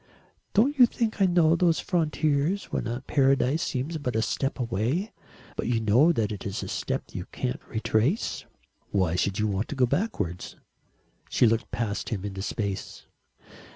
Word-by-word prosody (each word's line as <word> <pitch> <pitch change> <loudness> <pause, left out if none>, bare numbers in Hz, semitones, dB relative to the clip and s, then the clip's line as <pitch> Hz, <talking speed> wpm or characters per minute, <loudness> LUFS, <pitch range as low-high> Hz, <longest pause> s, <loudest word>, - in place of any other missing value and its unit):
"Don't 270 +7 +3
you 245 - +9
think 225 -3 -2
I 190 - +6
know 170 -2 +4
those 170 -1 +3
frontiers, 160 +1 0
when - - -1 0.2
paradise 135 +1 +2
seems 150 +6 -2
but 125 -5 -3
a 110 - +2
step 135 +3 -1
away, 125 - -1 0.4
but - - -2
you 120 -1 +1
know 115 +9 +5
that 110 -9 0
it 105 - -6
is 100 - -4
a - - -5
step - - -3
you - - -5
can't 60 - -3
retrace?" 115 - 0 0.4
"Why 95 -4 +1
should 95 +2 0
you 105 - +1
want 100 +1 -1
to - - -5
go 130 -2 +4
backwards?" 120 - -2 0.7
She - - +3
looked 115 0 +1
past 105 -2 -2
him 105 -5 -3
into 95 -1 -5
space. 100 -1 -4
125 Hz, 165 wpm, -27 LUFS, 105-165 Hz, 0.7 s, you